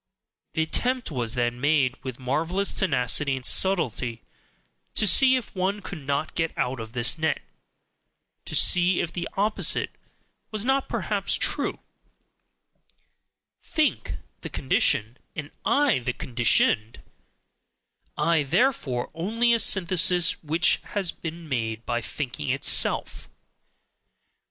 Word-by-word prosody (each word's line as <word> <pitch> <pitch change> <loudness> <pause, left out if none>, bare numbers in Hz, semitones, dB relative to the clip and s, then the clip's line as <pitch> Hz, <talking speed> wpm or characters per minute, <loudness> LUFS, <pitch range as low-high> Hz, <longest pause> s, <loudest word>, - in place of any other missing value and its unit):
The 160 - +1
attempt 250 +7 -1
was 120 -3 -2
then 120 0 -1
made, 140 -3 +2
with 130 -2 -6
marvelous 160 +10 -1
tenacity 140 - +1
and 130 -1 -7
subtlety, 130 - +1 0.7
to - - +2
see 260 +6 +6
if 250 -5 -4
one 195 +2 -2
could 155 -8 -8
not 145 +2 -1
get 165 -1 -2
out 125 0 -1
of 110 0 -8
this 125 +6 +1
net, 160 0 0 1.1
to - - -4
see 180 0 +5
if 170 - -3
the 175 -1 -4
opposite 210 +2 +1 0.6
was 215 0 -1
not 270 +1 +1
perhaps - - -1
true: - - 0 1.8
"think" 310 -2 -1 0.2
the - - -7
condition, 120 -3 0 0.2
and 150 -1 -6
"I" 280 - +3
the 125 0 -3
conditioned; 120 -3 +1 1.1
"I," 165 -2 +2
therefore, 145 - 0
only 230 +8 +1
a 230 - +2
synthesis 180 -3 +3
which 160 +3 +2
has 195 -4 -1
been 165 0 -8
MADE 115 -4 -3
by 120 -1 -1
thinking 125 - -5
itself. - - +1
160 Hz, 120 wpm, -25 LUFS, 125-190 Hz, 1.8 s, see